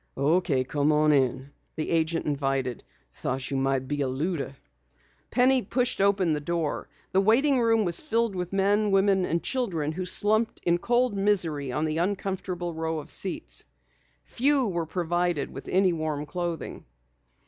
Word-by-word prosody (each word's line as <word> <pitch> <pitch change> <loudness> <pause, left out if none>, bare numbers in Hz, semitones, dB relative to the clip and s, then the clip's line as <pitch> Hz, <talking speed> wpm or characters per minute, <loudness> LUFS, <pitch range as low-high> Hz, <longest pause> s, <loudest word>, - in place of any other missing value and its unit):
"Okay, 145 -1 +2
come 145 +3 0
on 150 0 +3
in," 135 -1 +1 0.2
the 155 - -3
agent 165 0 +1
invited. 135 -4 -1 0.3
"Thought 130 +1 -3
you 135 - 0
might 135 -1 0
be 145 +1 -2
a 135 - +1
looter." 140 0 -3 0.7
Penny 255 +2 +3
pushed 245 +1 -1
open 195 -4 +3
the 150 - -1
door. 165 0 -2 0.2
The 190 - +3
waiting 250 +6 +3
room 225 -2 +3
was 175 - -1
filled 230 -7 0
with 180 -1 -4
men, 200 +2 +2
women 195 -1 +3
and 170 0 -1
children 175 - -1
who 185 +3 -4
slumped 215 +4 +2
in 175 0 +2
cold 240 +1 +1
misery 175 -9 +1
on 150 +5 -1
the 155 +1 -1
uncomfortable 185 -2 -2
row 160 0 -2
of 150 - -6
seats. - - 0 0.6
Few 270 - +1
were 170 -4 -2
provided 175 -3 -1
with 135 - -9
any 185 -1 +3
warm 155 -2 -3
clothing. 175 0 -5
170 Hz, 160 wpm, -26 LUFS, 150-200 Hz, 0.7 s, on